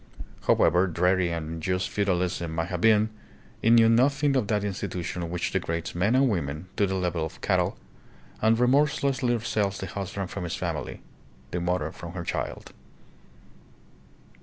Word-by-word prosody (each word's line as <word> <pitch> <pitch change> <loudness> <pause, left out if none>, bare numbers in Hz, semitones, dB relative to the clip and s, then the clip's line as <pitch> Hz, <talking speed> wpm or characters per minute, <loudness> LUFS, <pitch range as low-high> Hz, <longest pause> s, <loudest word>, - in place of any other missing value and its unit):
However 90 +3 +4
dreary 90 +1 +2
and 85 -2 -3
unjust 80 +3 -2
feu 100 - -1
dalism 90 -2 0
may 80 0 0
have 90 -1 -4
been, 110 -1 +4 0.5
it 115 - +3
knew 115 -1 +7
nothing 135 +5 +3
of 125 -6 +1
that 105 -2 0
institution 90 -4 -3
which 90 0 -2
degrades 85 -3 -2
men 100 +8 +2
and 135 +1 +4
women 80 - -2
to 100 - +2
the 95 - -2
level 90 -3 -1
of 80 - -6
cattle - - +1 0.6
and 110 +1 +4
remorselessly 130 -1 +2
sells 105 -3 -1
the - - -5
husband 95 0 -5
from - - -4
his 85 - -3
family, - - -4 0.5
the 90 - -2
mother 90 -3 -1
from 85 -1 -9
her 90 -1 -4
child. - - -4
95 Hz, 160 wpm, -26 LUFS, 85-110 Hz, 0.6 s, knew